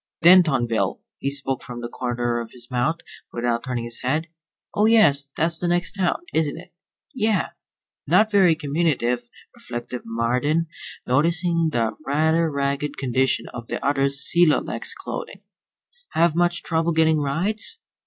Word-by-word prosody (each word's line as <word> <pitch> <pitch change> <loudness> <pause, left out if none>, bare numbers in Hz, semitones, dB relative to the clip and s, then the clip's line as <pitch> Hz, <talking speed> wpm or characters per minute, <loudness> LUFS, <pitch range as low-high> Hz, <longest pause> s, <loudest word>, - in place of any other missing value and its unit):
"Dentonville." 155 -11 +4 0.2
He 140 - -1
spoke 135 -2 -2
from 120 -1 -8
the 120 - -4
corner 120 -1 -2
of 115 -1 -7
his 125 +1 -13
mouth, 130 +7 0 0.3
without 120 0 -1
turning 125 -2 -3
his 115 0 -5
head. 145 +6 0 0.5
"Oh, 210 +1 +3
yes. 145 -12 +4
That's 165 +1 0
the 175 - -2
next 175 0 +1
town, 190 - -1
isn't 155 -3 0
it?" - - -13 0.4
"Yeah." 215 - 0 0.6
Not 210 +8 +4
very 190 -5 +5
communicative, 140 -6 -1 0.2
reflected 120 +1 -7
Marden, 125 +8 0 0.4
noticing 165 +4 +2
the 115 -4 0
rather 160 +3 +2
ragged 140 0 -2
condition 130 0 0
of 120 -1 -8
the - - -3
other's 140 0 +1
celo 170 -3 +4
lex - - -2
clothing. - - -7 0.7
"Have 170 -1 +3
much 175 +1 +1
trouble 165 0 0
getting 160 -1 +3
rides?" 195 - +1
145 Hz, 145 wpm, -23 LUFS, 125-170 Hz, 0.7 s, very